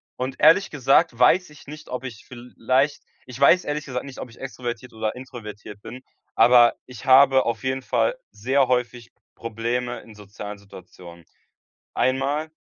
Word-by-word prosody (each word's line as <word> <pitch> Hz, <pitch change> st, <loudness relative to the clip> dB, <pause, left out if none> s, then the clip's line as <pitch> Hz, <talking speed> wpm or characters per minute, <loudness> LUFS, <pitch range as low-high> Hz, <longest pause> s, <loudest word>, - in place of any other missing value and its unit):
und, 130 Hz, +1 st, -5 dB
ehrlich 190 Hz, +4 st, +5 dB
gesagt 135 Hz, -4 st, +2 dB
weiß 170 Hz, +9 st, +4 dB
ich 150 Hz, -1 st, -17 dB
nicht, 150 Hz, +1 st, -11 dB
ob 125 Hz, +1 st, -5 dB
ich 120 Hz, -4 st, -9 dB
vielleicht 130 Hz, +3 st, -2 dB, 0.2 s
ich 125 Hz, -1 st, -10 dB
weiß, 170 Hz, +6 st, +5 dB
ehrlich 150 Hz, 0 st, -3 dB
gesagt, 125 Hz, -2 st, -5 dB
nicht, 135 Hz, -2 st, -10 dB
ob -, -, -7 dB
ich 115 Hz, -, -18 dB
extrovertiert 125 Hz, -2 st, -7 dB
oder 110 Hz, -1 st, -3 dB
introvertiert 110 Hz, -5 st, -10 dB
bin, 125 Hz, +4 st, -10 dB, 0.3 s
aber 120 Hz, -1 st, +6 dB
ich 125 Hz, -4 st, -12 dB
habe 130 Hz, 0 st, +6 dB
auf 120 Hz, +1 st, -3 dB
jeden 130 Hz, 0 st, -1 dB
Fall -, -, 0 dB
sehr 130 Hz, +5 st, +1 dB
häufig 120 Hz, -1 st, -2 dB, 0.2 s
Probleme 120 Hz, +2 st, -3 dB
in 110 Hz, -, -16 dB
sozialen 105 Hz, 0 st, -9 dB
Situationen. 90 Hz, -3 st, -14 dB, 0.7 s
Einmal 140 Hz, +4 st, -1 dB
125 Hz, 155 wpm, -23 LUFS, 115-135 Hz, 0.7 s, aber